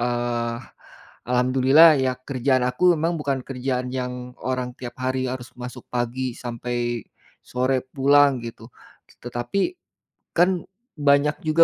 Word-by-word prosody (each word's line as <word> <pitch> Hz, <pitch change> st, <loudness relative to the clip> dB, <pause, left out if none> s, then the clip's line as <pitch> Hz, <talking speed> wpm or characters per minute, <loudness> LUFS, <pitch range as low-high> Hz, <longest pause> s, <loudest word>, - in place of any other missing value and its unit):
eee, 120 Hz, -1 st, -1 dB, 0.8 s
alhamdulillah 130 Hz, +5 st, +6 dB
ya 130 Hz, -, +2 dB, 0.2 s
kerjaan 130 Hz, -1 st, +1 dB
aku 125 Hz, -, -4 dB
memang 165 Hz, +3 st, 0 dB
bukan 140 Hz, -2 st, -1 dB
kerjaan 125 Hz, -1 st, -2 dB
yang 125 Hz, 0 st, -3 dB, 0.3 s
orang 130 Hz, -1 st, -2 dB
tiap 120 Hz, -2 st, -7 dB
hari 130 Hz, 0 st, 0 dB
harus 125 Hz, -1 st, -6 dB
masuk 125 Hz, 0 st, -7 dB
pagi 120 Hz, +1 st, -1 dB, 0.2 s
sampai 120 Hz, 0 st, -3 dB, 0.7 s
sore 130 Hz, +2 st, +1 dB, 0.2 s
pulang 140 Hz, +1 st, +5 dB
gitu. 115 Hz, -1 st, -8 dB, 0.6 s
Tetapi, 120 Hz, +10 st, -3 dB, 0.8 s
kan 175 Hz, +2 st, +6 dB, 0.5 s
banyak 145 Hz, +1 st, +4 dB
juga 160 Hz, +2 st, +6 dB
130 Hz, 120 wpm, -23 LUFS, 120-140 Hz, 0.8 s, alhamdulillah